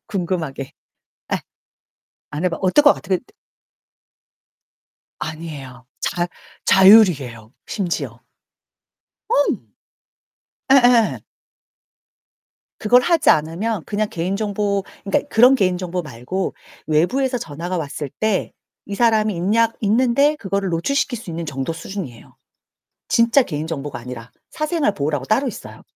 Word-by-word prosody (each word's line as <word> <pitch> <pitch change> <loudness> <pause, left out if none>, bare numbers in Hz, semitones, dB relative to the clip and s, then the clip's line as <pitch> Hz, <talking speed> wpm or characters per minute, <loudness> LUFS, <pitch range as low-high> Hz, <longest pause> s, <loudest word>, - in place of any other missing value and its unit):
궁금하게. 170 -8 -3 0.6
예. - - +1 0.9
안 150 +4 -3
해봐 170 -2 0
어떨 190 +10 +4
거 290 - +7
같애 185 -2 -2
그 - - -16 2.0
아니에요. 145 -6 -7
자 175 +1 -1 0.4
자율이에요, 165 - +5
심지어. 180 -5 -3 1.1
어. - - +1 1.4
예예. 245 -4 +5 1.6
그걸 245 +4 +4
하지 335 +2 +3
않으면 170 +6 0
그냥 215 0 -1
개인 180 +1 -2
정보 205 -1 -1 0.2
그니까 200 +8 0
그런 250 +4 +6
개인 185 -6 +1
정보 180 0 -3
말고 150 +7 -4 0.3
외부에서 250 - +1
전화가 170 +2 -5
왔을 145 -2 -4
때 215 -3 0 0.3
"이 205 - -5
사람이 215 -2 +2
있냐? 220 +6 +2
있는데?" 250 +7 +3
그거를 200 -5 -2
노출시킬 245 - 0
수 210 - -9
있는 165 0 -5
정도 135 +1 -3
수준이에요. 160 - -8 0.7
진짜 235 +4 +4
개인 155 -8 -4
정보가 145 -4 -5
아니라 120 -1 -9 0.2
사생활 305 - 0
보호라고 145 -5 -2
따로 255 - +1
있어요. - - -9
190 Hz, 260 characters per minute, -20 LUFS, 155-225 Hz, 2.0 s, 거